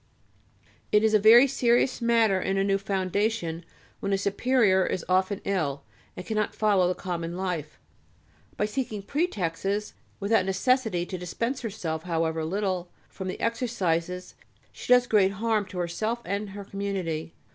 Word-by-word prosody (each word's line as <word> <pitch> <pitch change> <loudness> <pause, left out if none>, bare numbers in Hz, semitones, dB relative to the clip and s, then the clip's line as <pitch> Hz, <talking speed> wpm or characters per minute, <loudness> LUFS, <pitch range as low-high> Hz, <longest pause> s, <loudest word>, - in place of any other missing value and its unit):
It 210 0 +4
is 220 0 +3
a 215 - +6
very 225 +5 +8
serious 250 -1 +2
matter 225 -5 +3
in 195 - -1
a 195 - +2
new 195 0 +1
foundation 195 -2 -1 0.4
when 200 - -2
a 195 - +3
superior 200 -1 +2
is 180 - -2
often 185 +2 +1
ill, 150 -8 -1 0.3
and 180 - -6
cannot 215 -2 -1
follow 200 -4 +3
the 180 - 0
common 170 -2 -4
life. 180 -5 -3 0.8
By 210 - +1
seeking 215 -2 -3
pretexts, 200 - -2 0.3
without 200 -1 +2
necessity, 205 -2 +1
to 185 0 -6
dispense 230 +9 -3
herself, 180 -9 -4
however 165 -2 -1
little, 185 0 -2 0.2
from 190 - -7
the 185 - -4
exercises, 185 -7 -1 0.4
she - - -7
does 250 0 +7
great 200 -4 +3
harm 215 0 0
to 185 -1 -9
herself 215 +7 -2
and 200 +2 -3
her 200 +1 -8
community. 190 -6 -4
195 Hz, 150 wpm, -27 LUFS, 180-220 Hz, 0.8 s, very